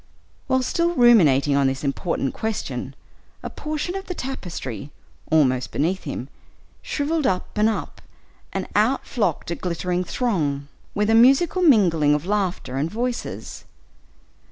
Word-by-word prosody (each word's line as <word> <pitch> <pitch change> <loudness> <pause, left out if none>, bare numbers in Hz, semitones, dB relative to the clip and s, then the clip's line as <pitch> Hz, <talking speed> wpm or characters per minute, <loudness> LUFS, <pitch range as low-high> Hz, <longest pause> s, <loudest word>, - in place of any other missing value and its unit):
While 260 0 +2
still 340 +6 0
ruminating 155 - +5
on 140 -1 +3
this 135 +1 -2
important 140 -1 -1
question, 220 -1 -4 0.5
a - - -5
portion 305 +3 -4
of 390 0 -5
the 360 - -4
tapestry, 170 - -5 0.4
almost 130 -5 +3
beneath 175 +6 -1
him, 135 -3 -5 0.5
shriveled 315 - -1
up 185 -1 -2
and 215 +1 +3
up, 220 - -4 0.5
and - - -3
out 220 +6 +2
flocked 190 - -1
a - - -1
glittering 180 +1 -2
throng, 155 - -1 0.3
with 210 +1 +2
a - - +4
musical 270 +10 +5
mingling 175 - +4
of 150 +2 -3
laughter 185 -9 -1
and 150 +4 0
voices. 240 +4 -4
195 Hz, 135 wpm, -23 LUFS, -, 0.5 s, ruminating